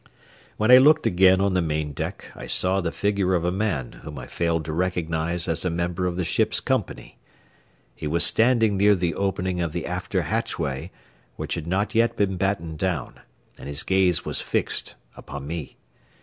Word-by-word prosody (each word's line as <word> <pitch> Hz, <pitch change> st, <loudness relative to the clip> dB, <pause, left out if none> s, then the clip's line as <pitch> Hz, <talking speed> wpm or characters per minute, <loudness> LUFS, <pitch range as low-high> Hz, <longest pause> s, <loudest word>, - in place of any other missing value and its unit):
When 110 Hz, +3 st, +3 dB
I 125 Hz, -, +10 dB
looked 155 Hz, +3 st, +5 dB
again 95 Hz, +1 st, +5 dB
on 100 Hz, -1 st, +1 dB
the 90 Hz, -, +2 dB
main 75 Hz, -2 st, -2 dB
deck 70 Hz, -, -6 dB
I -, -, -8 dB
saw 95 Hz, +1 st, +2 dB
the 85 Hz, -2 st, -2 dB
figure 100 Hz, -2 st, 0 dB
of 85 Hz, -1 st, 0 dB
a 90 Hz, -, +1 dB
man 95 Hz, -, -2 dB
whom 75 Hz, -2 st, -9 dB
I 65 Hz, -, -7 dB
failed 85 Hz, -2 st, -1 dB
to 80 Hz, -, -4 dB
recognize 85 Hz, -1 st, -1 dB
as 85 Hz, 0 st, -1 dB
a 90 Hz, -, 0 dB
member 85 Hz, +2 st, -1 dB
of 90 Hz, -1 st, -3 dB
the 90 Hz, -, 0 dB
ship's -, -, +1 dB
company. -, -, -3 dB, 0.7 s
He 75 Hz, -, -6 dB
was 85 Hz, +3 st, +2 dB
standing 115 Hz, -3 st, +3 dB
near 100 Hz, +1 st, +5 dB
the 90 Hz, -3 st, -1 dB
opening 95 Hz, -2 st, -1 dB
of 85 Hz, -3 st, -2 dB
the -, -, -3 dB
after -, -, -2 dB
hatchway, 70 Hz, +6 st, -2 dB, 0.5 s
which -, -, -4 dB
had 80 Hz, -1 st, -5 dB
not 95 Hz, +4 st, -1 dB
yet 115 Hz, +1 st, +2 dB
been 100 Hz, -2 st, +1 dB
battened 90 Hz, -4 st, -2 dB
down, 90 Hz, -8 st, -2 dB, 0.4 s
and -, -, -9 dB
his 70 Hz, +1 st, -1 dB
gaze 95 Hz, -3 st, +2 dB
was -, -, -2 dB
fixed -, -, -2 dB, 0.2 s
upon 70 Hz, 0 st, -8 dB
me. 80 Hz, -1 st, -6 dB
90 Hz, 190 wpm, -24 LUFS, 80-95 Hz, 0.7 s, I